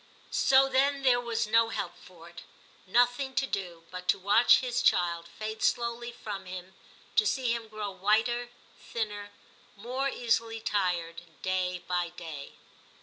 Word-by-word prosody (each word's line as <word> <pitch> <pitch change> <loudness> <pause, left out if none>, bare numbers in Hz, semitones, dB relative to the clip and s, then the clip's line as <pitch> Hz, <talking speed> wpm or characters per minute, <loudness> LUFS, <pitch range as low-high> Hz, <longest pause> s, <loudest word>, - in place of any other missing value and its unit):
So, 270 0 +5
then, 275 +1 +2
there 250 -2 +5
was 230 -1 -1
no 225 +1 +3
help - - -4
for 170 -2 -15
it; 170 - -11 0.5
nothing 245 +5 +2
to 270 - +2
do 180 -8 -4
but 180 0 -7
to - - +4
watch 205 +5 +6
his 250 -2 -1
child 170 -1 +2
fade 220 0 -6
slowly 235 0 0
from 205 -5 -7
him, 185 0 -8 0.4
to 215 - +4
see 245 +3 +1
him 230 -1 -4
grow 215 -2 -5
whiter, 220 +5 +1 0.3
thinner, 210 -3 -4 0.5
more 250 +6 -2
easily 230 -2 0
tired 175 -6 -1 0.2
day 180 -1 -1
by 175 -1 0
day. 160 -5 -8
215 Hz, 145 wpm, -29 LUFS, 180-240 Hz, 0.5 s, watch